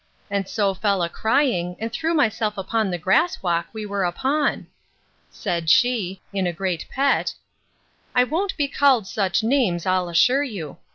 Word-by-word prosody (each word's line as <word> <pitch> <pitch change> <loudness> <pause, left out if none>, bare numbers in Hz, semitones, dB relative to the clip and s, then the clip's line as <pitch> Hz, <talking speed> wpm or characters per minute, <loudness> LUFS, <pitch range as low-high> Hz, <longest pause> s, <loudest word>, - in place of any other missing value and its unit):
And 200 -1 -1
so 200 -3 +1
fell 195 -1 0
a 170 - -1
crying, 220 -6 0
and 225 +1 -5
threw 325 +4 -1
myself 215 -7 +1
upon 210 +2 -1
the 175 - -2
grass 195 - +1
walk 170 -2 0
we 220 -1 -6
were 200 -1 -2
upon.—Said 180 - -3
she, 200 -4 +2
in 190 -2 0
a - - 0
great 175 -1 -3
pet, 275 +1 +1 0.8
I 250 - +6
won't 360 +9 -2
be 290 -2 +1
called 270 -6 +3
such 195 +1 0
names, 225 -9 +1
I'll 185 -1 +1
assure 250 +12 +4
you. 195 - -6
205 Hz, 160 wpm, -23 LUFS, 180-260 Hz, 0.8 s, I